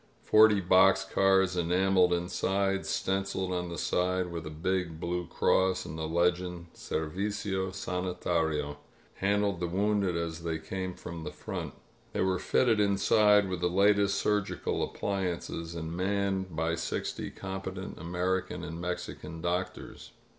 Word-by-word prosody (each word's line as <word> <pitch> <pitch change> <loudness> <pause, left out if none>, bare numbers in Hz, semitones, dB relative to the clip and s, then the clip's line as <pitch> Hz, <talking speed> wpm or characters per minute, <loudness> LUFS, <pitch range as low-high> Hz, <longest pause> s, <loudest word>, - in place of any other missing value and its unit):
Forty 110 -2 +6
box 95 +1 +5
cars, 95 -1 +3
enameled 90 +1 +3
inside, 95 +3 0
stenciled 95 -1 -1
on 90 -1 -2
the 85 - -5
side 90 0 0
with 85 -2 -5
a - - -4
big 85 +1 -2
blue 90 0 -2
cross 95 +2 +2
and 75 - -6
the 80 0 -3
legend, 85 +1 0
"Servicio 95 +3 -2
Sani 90 -1 -3
tario," 75 -4 0 0.4
handled 100 -1 +1
the 90 - -1
wounded 100 0 +1
as 85 -1 -3
they 80 -1 -2
came 95 +2 -5
from 85 -1 -7
the 75 - -5
front. - - -6 0.4
They - - -1
were 95 -1 +1
fitted 115 -4 +2
inside 105 0 +4
with 90 -2 -3
the 90 - +2
latest 100 +1 +3
surgical 105 -2 0
appliances 90 -4 -3
and 80 0 -4
manned 95 -1 -1
by 80 +1 0
sixty - - -3
competent 95 0 -6
American 90 +3 -2
and 80 +2 -6
Mexican 90 -2 -5
doctors. 90 +2 -4
90 Hz, 140 wpm, -30 LUFS, 85-95 Hz, 0.4 s, Forty